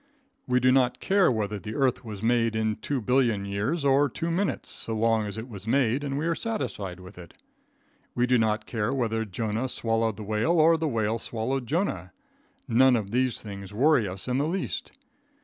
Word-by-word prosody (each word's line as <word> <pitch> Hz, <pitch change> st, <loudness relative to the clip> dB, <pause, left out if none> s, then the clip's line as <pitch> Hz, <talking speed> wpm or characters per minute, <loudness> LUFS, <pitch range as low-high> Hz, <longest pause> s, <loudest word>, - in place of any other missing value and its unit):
We 125 Hz, 0 st, +3 dB
do 130 Hz, +1 st, +4 dB
not 130 Hz, -1 st, +2 dB
care 195 Hz, -6 st, +3 dB
whether 105 Hz, -3 st, -2 dB
the 105 Hz, +4 st, -7 dB
earth 130 Hz, -2 st, +1 dB
was 110 Hz, -3 st, -8 dB
made 115 Hz, -1 st, +2 dB
in 110 Hz, -1 st, 0 dB
two 140 Hz, -3 st, -3 dB
billion 120 Hz, -4 st, +1 dB
years 110 Hz, +11 st, -2 dB
or 140 Hz, +1 st, +4 dB
two 165 Hz, +1 st, -3 dB
minutes, 190 Hz, +3 st, -1 dB
so 115 Hz, -, -2 dB
long 110 Hz, -1 st, +1 dB
as 100 Hz, +1 st, -6 dB
it 110 Hz, +2 st, -6 dB
was 100 Hz, -4 st, -10 dB
made 130 Hz, +2 st, +2 dB
and 140 Hz, -1 st, -2 dB
we 150 Hz, -, -1 dB
are 170 Hz, -, +1 dB
satisfied 105 Hz, -, -4 dB
with 90 Hz, +1 st, -12 dB
it. 85 Hz, -2 st, -12 dB, 0.8 s
We 125 Hz, -, +2 dB
do 125 Hz, -1 st, +3 dB
not 110 Hz, -1 st, 0 dB
care 115 Hz, 0 st, -2 dB
whether 115 Hz, -4 st, -1 dB
Jonah 110 Hz, +4 st, -2 dB
swallowed 115 Hz, -2 st, -1 dB
the 110 Hz, -, -6 dB
whale 110 Hz, +11 st, +1 dB
or 165 Hz, +2 st, +6 dB
the 160 Hz, 0 st, -1 dB
whale 115 Hz, -3 st, 0 dB
swallowed 120 Hz, +3 st, -3 dB
Jonah. 110 Hz, -, -2 dB, 0.5 s
None 130 Hz, +2 st, +5 dB
of 105 Hz, -4 st, -2 dB
these 125 Hz, -1 st, 0 dB
things 100 Hz, -1 st, -8 dB
worry 130 Hz, -2 st, +3 dB
us 95 Hz, +3 st, -6 dB
in 125 Hz, +1 st, 0 dB
the 145 Hz, -, +1 dB
least. 185 Hz, +3 st, -3 dB
115 Hz, 200 wpm, -26 LUFS, 105-135 Hz, 0.8 s, or